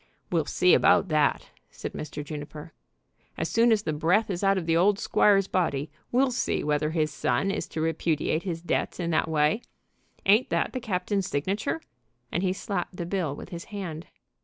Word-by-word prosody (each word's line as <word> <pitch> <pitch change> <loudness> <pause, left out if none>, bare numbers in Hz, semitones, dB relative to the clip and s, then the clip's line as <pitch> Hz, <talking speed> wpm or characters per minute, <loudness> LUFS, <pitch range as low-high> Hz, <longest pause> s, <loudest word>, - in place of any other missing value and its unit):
"We'll 165 -4 +1
see 180 +4 +3
about 190 - +4
that," 155 -2 +1 0.2
said - - -7
Mr. 150 -1 -6
Juniper. 150 +1 -8 0.6
"As 160 - -2
soon 230 +1 +4
as 215 -2 +3
the 155 - -1
breath 180 +8 +2
is 180 +1 -3
out 195 0 +4
of 180 - -2
the 165 0 +2
old 195 +4 +4
squire's 200 -1 +3
body 145 -5 -1 0.2
we'll 255 +2 +3
see 245 - -1
whether 150 0 +1
his 155 -2 0
son 135 +7 0
is - - -3
to 160 - -4
repudiate 160 0 0
his 170 -3 -4
debts 175 - -1
in 170 -1 -1
that 160 - +1
way. 155 +7 +2 0.6
Ain't 210 +6 +4
that - - 0
the 255 - -2
captain's 195 -3 -1
signature?" 200 - -2 0.5
and 175 - 0
he 185 -1 +1
slapped 185 -2 -4
the 170 - -3
bill 175 -6 -2
with - - -9
his 170 -1 -7
hand. 175 -6 -6
175 Hz, 185 wpm, -27 LUFS, 155-195 Hz, 0.6 s, about